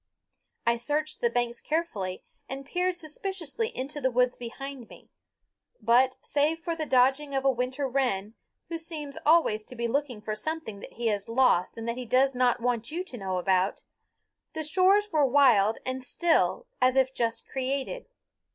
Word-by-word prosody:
I 235 0 +3
searched 300 +5 -2
the 235 - +3
banks 240 0 -1
carefully 215 - -3 0.3
and 270 +1 -6
peered 360 +4 0
suspiciously 355 +4 -3
into 295 - -5
the 260 - +2
woods 250 0 +2
behind 255 +1 -8
me; - - -16 0.7
but 250 +4 +3
save 295 +3 +2
for 335 0 -3
the 315 -2 -4
dodging 270 +3 +3
of 270 0 -1
a 270 - +6
winter 255 +3 -2
wren, 245 -6 -1 0.4
who 330 -1 -3
seems 305 -4 -5
always 305 -10 +4
to 250 - -9
be 235 0 -1
looking 260 -2 -1
for 215 0 -4
something 220 -2 -4
that - - -11
he 235 - -5
has 205 0 -2
lost 230 -7 +3
and 225 0 -5
that 235 +1 -2
he 255 - -5
does 265 +3 +3
not 250 -1 +2
want 235 -1 -1
you 345 +4 -3
to 315 - -10
know 190 -3 -2
about, 185 +1 +1 0.7
the 315 -1 -3
shores 380 +6 +4
were 305 -3 +3
wild 245 -6 +5
and 255 0 -3
still 345 - +1 0.2
as 255 0 +4
if 265 0 +3
just 230 -2 -1
created. 270 - -3
260 Hz, 175 wpm, -28 LUFS, 235-305 Hz, 0.7 s, a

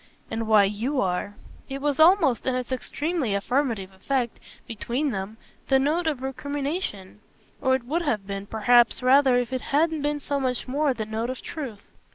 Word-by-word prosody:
"And 225 0 -2
why 215 -2 +6
YOU 225 +8 -1
are." 190 +1 -1 0.3
It 270 0 -4
was 290 +1 -1
almost, 320 - +5
in 260 - +1
its 255 0 -4
extremely 280 - -1
affirmative 220 -3 -1
effect 240 +5 -2 0.3
between 245 +6 -2
them, 195 +1 -5 0.3
the 270 - +4
note 310 +6 +1
of 280 -5 -1
recrimination; 270 - -4 0.4
or 260 0 +3
it 260 - -3
would 320 +7 -1
have 230 -11 -1
been 195 0 -5
perhaps 240 +3 +3
rather 260 0 +5
if 245 +1 -1
it 255 - -1
hadn't 315 +2 +1
been 295 0 -1
so 285 0 -2
much 255 -1 -2
more 280 +1 +1
the 220 -2 -3
note 220 +2 -3
of 255 - -6
truth. 250 -10 -6
255 Hz, 180 wpm, -25 LUFS, 220-285 Hz, 0.4 s, why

